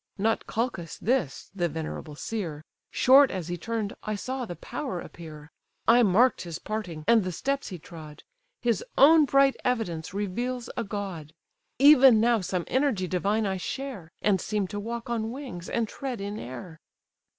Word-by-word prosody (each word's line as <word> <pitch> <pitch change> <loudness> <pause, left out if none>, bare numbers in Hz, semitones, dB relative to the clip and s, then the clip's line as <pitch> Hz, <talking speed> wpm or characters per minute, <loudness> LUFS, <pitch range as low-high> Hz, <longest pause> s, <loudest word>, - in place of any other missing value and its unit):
Not 220 +3 0
Calchas 220 -8 -3
this, 230 - -1
the 175 -3 0
venerable 155 -1 -6
seer; 165 -5 -4 0.3
Short 270 +1 +6
as 180 -3 -5
he 175 - -2
turned, 215 +3 -3
I 215 - -3
saw 255 +4 -4
the 175 - -7
power 255 - -5
appear: 155 -3 -11 0.4
I 240 +2 +7
mark'd 230 +4 +4
his 170 -3 -5
parting, 185 -8 -5
and 230 -3 +5
the 185 - -3
steps 275 - -2
he 185 - -6
trod; 155 -2 -12 0.4
His 235 -5 +1
own 310 +2 +7
bright 275 0 +4
evidence 200 -11 -1
reveals 235 +6 -3
a 235 - -1
god. 195 -7 -6 0.4
Even 265 -4 +8
now 230 -1 +3
some 180 -1 -2
energy 260 -9 0
divine 200 +5 0
I 190 -1 -1
share, 215 -5 -6
And 195 -4 +3
seem 210 -2 -1
to 205 - -4
walk 235 +3 -5
on 225 -2 -2
wings, 235 -9 -7
and 235 -1 0
tread 255 0 -5
in 205 +2 -5
air!" 130 +7 -8
210 Hz, 165 wpm, -27 LUFS, 175-245 Hz, 0.4 s, Even